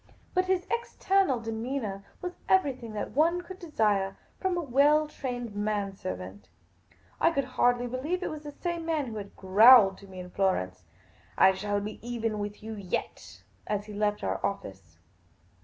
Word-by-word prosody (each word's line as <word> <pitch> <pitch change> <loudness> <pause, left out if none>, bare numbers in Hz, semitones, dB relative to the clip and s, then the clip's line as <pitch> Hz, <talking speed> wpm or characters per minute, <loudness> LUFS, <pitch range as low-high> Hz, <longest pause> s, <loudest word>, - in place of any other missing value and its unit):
But 370 0 +2
his 370 -1 +1
external 390 - +1
demeanour 225 -2 -4 0.2
was 360 0 -3 0.2
everything 260 -11 +2
that 210 - -4
one 335 +5 +2
could 370 +2 -10
desire 210 - 0 0.2
from 375 -2 0
a - - 0
well 295 +2 +4
trained 245 -7 -5
man 205 -1 -1
servant; 95 - -7 0.7
I - - +5
could 280 -5 0
hardly 245 -1 +2
believe 285 +9 -2
it - - -2
was 305 -1 -6
the 295 -1 -8
same 345 +2 -4
man 320 -3 0
who 225 -3 -6
had 200 -1 -8
growled 200 +1 +7
to 200 - -14
me 185 -1 -10
at 180 0 -11
Florence, 95 - 0 0.3
" - - -30
I 190 - +7
shall 205 +2 -1
be 210 +1 -6
even 225 -2 -2
with 205 0 -5
yow 220 0 -5
yet," 190 -3 -5 0.2
as 205 -1 -1
he 210 - -9
left 210 0 0
our - - -2
office. 95 - -5
225 Hz, 175 wpm, -29 LUFS, 200-300 Hz, 0.7 s, growled